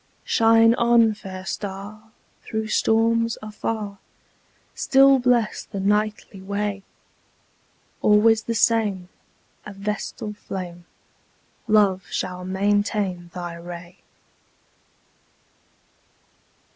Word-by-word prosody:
Shine 225 Hz, 0 st, +5 dB
on, 235 Hz, -2 st, +4 dB
fair 190 Hz, -2 st, -9 dB
star, 205 Hz, +3 st, -6 dB, 0.3 s
through 220 Hz, 0 st, -4 dB
storms, 230 Hz, +1 st, +2 dB
afar! 215 Hz, -1 st, -5 dB, 0.7 s
Still 270 Hz, 0 st, +5 dB
bless 245 Hz, -3 st, +1 dB
the 200 Hz, -, -6 dB
nightly 210 Hz, 0 st, -1 dB
way! 200 Hz, +1 st, -3 dB, 1.2 s
Always 215 Hz, +1 st, +4 dB
the 230 Hz, +1 st, -3 dB
same, 210 Hz, -6 st, +1 dB, 0.5 s
a 210 Hz, -, -9 dB
vestal 210 Hz, +1 st, -4 dB
flame, 175 Hz, -4 st, -7 dB, 0.8 s
Love 200 Hz, -3 st, +3 dB
shall 180 Hz, 0 st, -4 dB
maintain 195 Hz, -1 st, -1 dB
thy 175 Hz, -1 st, -5 dB
ray. 175 Hz, +1 st, -10 dB
210 Hz, 80 wpm, -23 LUFS, 190-225 Hz, 1.2 s, Shine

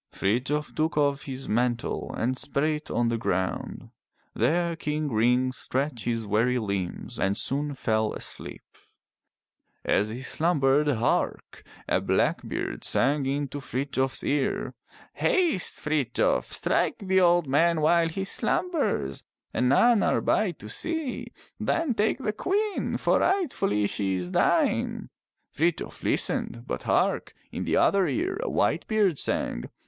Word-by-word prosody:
Frithjof 130 Hz, +9 st, -1 dB
took 155 Hz, 0 st, -1 dB
off 140 Hz, -1 st, +1 dB
his 135 Hz, -1 st, -6 dB
mantle 120 Hz, +1 st, -1 dB
and 125 Hz, +3 st, 0 dB
spread 140 Hz, +2 st, -2 dB
it 150 Hz, 0 st, -5 dB
on 120 Hz, -1 st, +1 dB
the 115 Hz, -1 st, -1 dB
ground. 95 Hz, -4 st, -3 dB, 0.4 s
There 170 Hz, +8 st, +1 dB
King 150 Hz, -2 st, -2 dB
Ring 125 Hz, +3 st, +3 dB
stretched 130 Hz, -1 st, -2 dB
his 115 Hz, -2 st, -1 dB
weary 115 Hz, +5 st, +2 dB
limbs 100 Hz, -6 st, -4 dB
and 95 Hz, +1 st, +1 dB
soon 145 Hz, +1 st, -2 dB
fell 110 Hz, -3 st, 0 dB
asleep. -, -, -6 dB, 1.2 s
As 105 Hz, +2 st, +2 dB
he 120 Hz, +4 st, -6 dB
slumbered, 150 Hz, -2 st, +2 dB
hark! 120 Hz, -5 st, -1 dB, 0.3 s
a -, -, +1 dB
blackbird -, -, -1 dB
sang 140 Hz, +2 st, +2 dB
into 140 Hz, 0 st, -2 dB
Frithjof 135 Hz, 0 st, -2 dB
*s -, -, -4 dB
ear: 140 Hz, -1 st, -1 dB, 0.2 s
'* -, -, -23 dB
Haste, 340 Hz, -, +2 dB
Frithjof, 150 Hz, -5 st, 0 dB
strike -, -, +1 dB
the 190 Hz, -1 st, +2 dB
old 175 Hz, -1 st, +4 dB
man 160 Hz, +5 st, +2 dB
while 165 Hz, +2 st, +3 dB
he 190 Hz, +4 st, -3 dB
slumbers 230 Hz, -, 0 dB, 0.3 s
and 125 Hz, -, +1 dB
none 230 Hz, -, +5 dB
are -, -, +2 dB
by 215 Hz, -, +1 dB
to 150 Hz, -11 st, -9 dB
see. 320 Hz, -, -2 dB, 0.3 s
Then 330 Hz, -6 st, 0 dB
take 215 Hz, +1 st, +1 dB
the 220 Hz, -6 st, -2 dB
Queen, 405 Hz, -, -1 dB
for -, -, +2 dB
rightfully 280 Hz, -, +1 dB
she 100 Hz, -1 st, -1 dB
is 90 Hz, -1 st, -3 dB
thine! -, -, +1 dB, 0.2 s
" -, -, -53 dB
Frithjof 165 Hz, +2 st, -1 dB
listened, 120 Hz, 0 st, -1 dB
but -, -, -4 dB
hark! -, -, +1 dB, 0.2 s
in -, -, -4 dB
the -, -, +1 dB
other 195 Hz, -2 st, +3 dB
ear 370 Hz, +5 st, -1 dB
a -, -, -2 dB
white -, -, 0 dB
bird 205 Hz, -8 st, +2 dB
sang. -, -, -1 dB
145 Hz, 145 wpm, -26 LUFS, 120-175 Hz, 1.2 s, none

